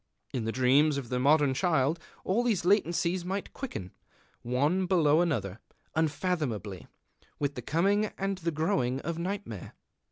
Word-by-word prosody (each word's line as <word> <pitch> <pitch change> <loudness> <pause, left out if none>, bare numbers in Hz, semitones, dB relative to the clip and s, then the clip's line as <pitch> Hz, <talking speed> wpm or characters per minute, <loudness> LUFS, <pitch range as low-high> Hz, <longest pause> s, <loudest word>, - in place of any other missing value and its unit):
In 120 -4 -2
the 115 - 0
dreams 140 +4 +4
of 130 -4 -5
the 125 - 0
modern 145 +1 +4
child 155 +1 +1 0.2
all 195 +6 +1
these 225 -8 +1
latencies 175 -2 +2
might 190 +2 -4
quicken, 95 - -6 0.5
one 145 +10 +1
below 165 -4 +4
another, 115 - -1 0.3
unfathomably, 150 - -1 0.5
with 145 -1 -1
the 125 - -6
coming 195 - +2
and 195 -1 -2
the 170 -1 -1
growing 155 -5 0
of 170 0 -4
nightmare. 180 - -5
155 Hz, 140 wpm, -29 LUFS, 130-185 Hz, 0.5 s, dreams